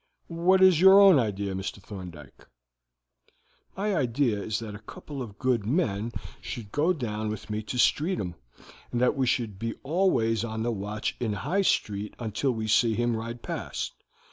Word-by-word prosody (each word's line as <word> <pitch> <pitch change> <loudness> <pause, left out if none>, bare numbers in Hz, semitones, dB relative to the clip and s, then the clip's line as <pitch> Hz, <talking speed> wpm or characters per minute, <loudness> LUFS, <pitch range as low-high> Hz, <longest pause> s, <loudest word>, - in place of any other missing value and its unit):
What 190 +1 +6
is 180 -4 +6
your 190 +1 +9
own 195 -7 +8
idea, 100 -4 -1
Mr. 95 +1 -4
Thorndyke?" 90 - -11 1.3
"My 205 0 0
idea 120 - +1
is 105 +1 -2
that 110 -2 -6
a 105 - -8
couple 135 +6 -9
of 105 -5 -8
good 125 -4 +1
men 115 - 0 0.3
should 105 -4 -7
go 155 +5 +2
down 110 -9 -3
with 105 0 -6
me 105 0 -2
to 110 +4 -5
Streatham, 145 - +1 0.6
and 120 - -1
that 125 - +3
we 135 -2 +1
should 115 -6 -1
be 115 0 -3
always 135 - +1
on 110 -1 -3
the 120 - 0
watch 105 0 -3
in 110 -3 -1
High 175 - 0
Street 105 - 0
until 115 +3 -2
we 110 -2 -3
see 110 +1 +3
him 120 0 +1
ride 115 +2 -6
past. - - -4
115 Hz, 170 wpm, -27 LUFS, 105-140 Hz, 1.3 s, your